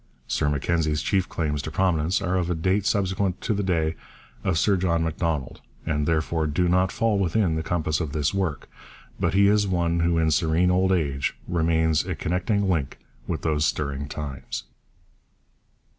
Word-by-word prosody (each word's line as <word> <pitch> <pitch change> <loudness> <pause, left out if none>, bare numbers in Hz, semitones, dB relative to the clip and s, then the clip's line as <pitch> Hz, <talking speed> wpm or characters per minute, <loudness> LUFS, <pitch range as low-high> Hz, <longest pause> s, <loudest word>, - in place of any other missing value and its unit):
Sir 75 - 0
Mackenzie's 75 +1 0
chief 95 -2 +1
claims 75 -3 -2
to - - -5
prominence 90 0 +1
are 90 0 0
of 90 -2 0
a 90 - 0
date 95 +5 +1
subsequent 95 -3 0
to 115 - 0
the 100 - -1
day 85 -5 0 0.5
of 90 -3 +1
Sir 100 +5 +3
John 85 -3 +1
Macdonald 80 -4 -2 0.2
and 75 -1 -1
therefore 80 0 0
do 90 +4 +1
not 90 +1 +2
fall 115 -3 +1
within 95 -1 +1
the 80 - -1
compass 80 -2 -1
of 80 -5 -3
this 75 +1 0
work; 95 -8 -2 0.5
but - - 0
he 100 +1 +5
is 105 0 +3
one 85 -2 +1
who 85 0 +2
in 80 -1 +2
serene 85 +2 +2
old 95 +1 +2
age 70 -7 0
remains 80 -2 +2
a - - -3
connecting 95 +4 0
link 80 -8 -1 0.3
with - - -3
those 75 -2 +1
stirring 70 -2 -1
times. 70 -3 -5
85 Hz, 175 wpm, -25 LUFS, 80-95 Hz, 0.5 s, he